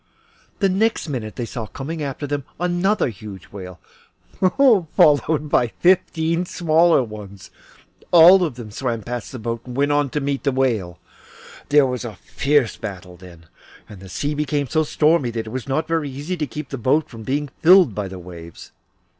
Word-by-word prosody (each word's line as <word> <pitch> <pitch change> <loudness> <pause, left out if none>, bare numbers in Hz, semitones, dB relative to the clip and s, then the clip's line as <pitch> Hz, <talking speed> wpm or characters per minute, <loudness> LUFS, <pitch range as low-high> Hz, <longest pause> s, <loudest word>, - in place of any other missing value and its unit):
The 195 - +2
next 205 +1 0
minute 115 -8 -5
they 120 - -3
saw 115 -1 -6
coming 155 +7 -6
after 140 0 -4
them 145 -1 -3 0.2
another 180 0 +1
huge 100 -3 -11
whale, 90 -3 -9 0.7
followed 160 - +3
by 125 -4 +2
fifteen 170 +2 +1
smaller 165 -3 +3
ones. 105 -4 -10 0.6
All 180 +2 +8
of 155 -8 -2
these 115 -4 -9
swam 120 -5 -2
past 120 -2 -5
the 130 - -7
boat 115 0 -4
and 125 0 -8
went 145 +1 +2
on 145 -1 +1
to 150 - -2
meet 140 -1 -2
the 140 - +1
whale. 115 -10 -1 0.7
There 145 -1 +5
was 125 -1 -3
a 115 -4 -7
fierce 140 +4 0
battle 95 -4 -8
then, 85 -2 -15 0.4
and 105 - -12
the 95 0 -12
sea 145 - -2
became 145 -1 -1
so 155 - +1
stormy 155 -3 +2
that 115 -1 -4
it 110 - -8
was 130 +1 -5
not 155 +4 -1
very 160 -3 -1
easy 145 +7 -5
to 155 -4 -3
keep 150 -1 -7
the 135 - -5
boat 140 +7 +1
from 115 -2 -11
being 140 +5 -2
filled 180 - +6
by 100 0 -3
the 95 0 -8
waves. 85 -2 -11
135 Hz, 180 wpm, -21 LUFS, 110-155 Hz, 0.7 s, All